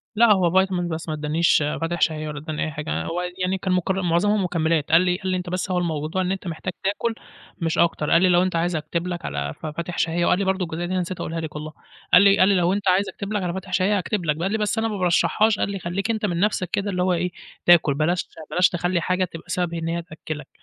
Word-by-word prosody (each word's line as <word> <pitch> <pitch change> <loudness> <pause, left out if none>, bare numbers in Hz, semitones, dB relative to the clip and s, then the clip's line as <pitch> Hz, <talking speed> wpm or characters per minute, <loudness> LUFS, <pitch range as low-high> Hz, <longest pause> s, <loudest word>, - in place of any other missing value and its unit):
لا 230 +1 +5
هو 190 0 +3
vitamin 185 -2 -2
بس 160 +1 -5
ما 155 - -2
ادّانيش 155 +3 +2 0.2
فاتح 170 +1 -2
شهية 155 -1 +1
والّا 150 -1 -5
ادّاني 155 0 -4
أي 155 - -4
حاجة، 150 +1 -3
هو 175 +2 -2 0.2
يعني 185 +1 0
كان 185 0 -1
مكر 190 +1 0
معظمهم 190 +4 +2
مكملات، 160 -3 0
قال 165 +2 +7
لي 180 -1 +1
قال 190 - -6
لي: 185 - +1
"أنت 180 -1 -5
بس 185 +1 -2
هو 180 - +1
الموضوع 160 0 -1
إن 185 0 -1
أنت 190 -1 -4
محتاج 170 +2 -4
تاكل 205 +4 0 0.5
مش 165 -1 0
أكتر"، 165 -3 +1
قال 165 - +5
لي: 185 - +4
"لو 175 0 +4
أنت 185 -2 -1
عايز 170 +1 0
أكتب 165 +3 -3
لك 175 -1 -4
على 70 0 -3
ف - - -7
فاتح 170 +3 -5
شهية"، 170 +1 +1
وقال 180 - +3
لي 200 - 0
برضو 190 0 0
الجزئية 165 +1 -4
دي 175 - -5
أنا 185 - +1
نسيت 180 +1 -5
أقولها 165 +1 -3
لك 160 -2 -6
والله، 155 +1 -6 0.4
قال 180 - +9
لي 200 0 +6
قال 185 - +6
لي: 200 - +4
"لو 180 0 +2
أنت 200 0 -2
عايز 190 +2 +2
أكتب 200 +1 -6
لك 205 -2 -1
على 175 -1 -2
فاتح 190 0 -7
شهية 195 +3 +2
أكتب 185 0 -2
لك"، 150 -2 +1
ب - - -6
قال 190 - 0
لي: 220 - +1
"بس 210 0 -1
أنا 225 0 +1
ما 215 -2 -3
بارشحّهاش"، 205 +4 +2
قال - - 0
لي: 195 - -4
"خلّيك 190 +5 -2
أنت 220 -1 -1
من 175 -4 -1
نَفسك 190 -3 0
كده 200 +2 -1
اللي 180 -1 0
هو 185 0 +2
إيه 180 +1 -1 0.3
تأكل، 170 -4 +6
بلاش 160 +5 0 0.2
بلاش 180 0 +4
تخلّي 175 0 -1
حاجة 185 +3 +1
تبقى 165 -1 -11
سبب 175 -2 -1
إن 165 -1 -3
هي 170 +1 -1
تأكّلك"، 155 -3 -8
180 Hz, 275 wpm, -23 LUFS, 165-190 Hz, 0.5 s, قال